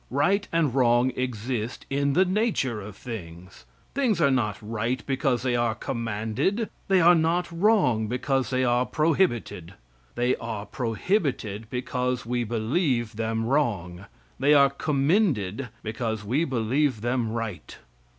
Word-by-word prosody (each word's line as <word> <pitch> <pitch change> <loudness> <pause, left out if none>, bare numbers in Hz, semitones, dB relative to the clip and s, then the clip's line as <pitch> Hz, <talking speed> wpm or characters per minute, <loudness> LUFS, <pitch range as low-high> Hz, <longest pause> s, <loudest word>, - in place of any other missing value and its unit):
Right 195 +10 +1
and 165 -6 +1
wrong 125 -1 +3
exist 120 -1 -3
in 140 0 0
the 185 +5 +4
nature 185 - 0
of 100 0 -9
things. 90 -6 -9 0.3
Things 255 -8 +1
are 140 -4 +4
not 110 -6 0
right 115 +3 -3
because 135 -2 0
they 125 -2 +1
are 120 -2 +1
commanded; 115 - -2 0.2
they 190 -1 +4
are 175 +1 +7
not 170 +2 +1
wrong 170 - +2
because 130 +3 -1
they 130 -1 +1
are 120 +1 +2
prohibited. 130 - 0 0.4
They 125 +1 +1
are 110 -3 -5
prohibited 115 - -2
because 125 0 -2
we 120 +1 -1
believe 120 - 0
them 115 0 -1
wrong; 100 -10 -1 0.3
they 145 +2 +5
are 140 -1 +6
commended 140 - 0
because 110 -1 -3
we 135 +10 +1
believe 130 -1 0
them 120 -1 -1
right. 110 -8 -5
125 Hz, 135 wpm, -26 LUFS, 110-145 Hz, 0.4 s, are